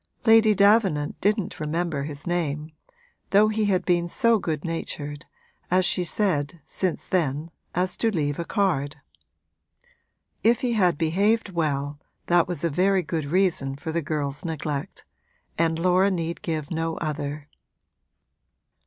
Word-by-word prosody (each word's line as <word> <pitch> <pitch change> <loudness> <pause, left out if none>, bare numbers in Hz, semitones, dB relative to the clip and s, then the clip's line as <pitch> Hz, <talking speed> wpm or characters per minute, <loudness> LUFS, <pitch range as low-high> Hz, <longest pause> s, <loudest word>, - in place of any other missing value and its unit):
Lady 225 -2 +6
Davenant 200 -7 +3
didn't 205 -1 0
remember 160 -1 -2
his 145 -1 -7
name, 155 -3 -2 0.6
though 210 +2 +5
he 215 0 0
had 185 -3 +1
been 175 -1 +2
so 230 +4 +3
good 155 -4 -3
natured, 150 -3 -4 0.4
as 185 +1 +3
she 180 - +2
said, 170 -4 0
since 185 +1 -2
then, 160 -2 -1 0.2
as 180 +1 0
to 230 - +2
leave 150 -7 -1
a - - -1
card. 165 -8 0 1.5
If 230 +2 +3
he 245 -2 0
had 180 -7 +2
behaved 200 +7 +1
well 145 -4 -2 0.3
that 175 -1 +3
was 175 -4 -4
a 170 - +2
very 185 +4 +2
good 155 0 -3
reason 160 -4 +1
for 160 +3 -5
the 170 +1 -1
girl's 145 -2 -3
neglect 155 -3 -4 0.5
and 165 -1 +1
Laura 185 +3 +3
need 170 -3 -3
give 155 -3 -3
no 165 0 -2
other. 145 -1 -4
170 Hz, 140 wpm, -25 LUFS, 150-190 Hz, 1.5 s, Lady